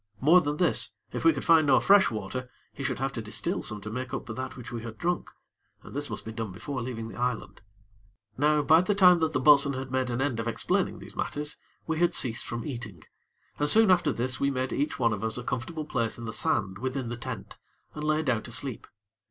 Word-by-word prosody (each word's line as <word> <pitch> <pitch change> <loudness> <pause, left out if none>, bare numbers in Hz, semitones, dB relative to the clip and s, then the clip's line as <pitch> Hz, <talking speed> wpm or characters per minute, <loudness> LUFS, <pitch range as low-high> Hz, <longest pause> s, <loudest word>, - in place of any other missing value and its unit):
More 165 +8 +6
than 145 -1 -2
this, 180 - +1 0.2
if - - -3
we 330 - +7
could - - -5
find 160 -3 +5
no 130 - +6
fresh 200 0 +5
water, 120 +4 -5 0.2
he - - -9
should - - -1
have - - -2
to - - -4
distil - - -2
some 105 -1 -4
to 105 +2 -7
make 130 +3 -4
up - - -5
for 115 - -6
that 130 +3 -6
which 125 -1 -9
we 120 -1 -4
had 115 -1 -8
drunk, 175 +5 -1 0.5
and - - -12
this - - -2
must - - -6
be 110 - -5
done 110 -3 -5
before 130 +7 -5
leaving 115 -2 -5
the 115 - -10
island. 125 -2 -2 0.7
Now 150 +3 +2
by 160 +3 +6
the 195 +3 0
time 180 -3 +7
that 160 -1 +1
the - - 0
bo'sun 140 0 +6
had 130 0 -5
made 130 -1 0
an 120 0 -2
end 135 -4 0
of 115 - -3
explaining 115 - 0
these - - -11
matters, 150 +1 -3 0.3
we 160 -1 -2
had 175 0 +3
ceased 115 -2 +1
from 120 -1 -4
eating, 115 -9 -7 0.6
and 145 0 +2
soon 220 0 +6
after 175 -5 +3
this 130 +1 -2
we 140 - +2
made 130 -1 -2
each 145 +2 -1
one 115 -3 +2
of 105 0 -5
us 110 +1 -1
a 125 - -5
comfortable 150 +7 -4
place 115 -6 -2
in 120 - -7
the 115 - -5
sand 100 -2 0
within 130 0 -3
the 120 - -3
tent, 120 -4 -7 0.4
and 150 - -6
lay 155 +1 +1
down 120 -6 +1
to 120 - -9
sleep. 130 -1 -4
130 Hz, 240 wpm, -28 LUFS, 115-150 Hz, 0.7 s, we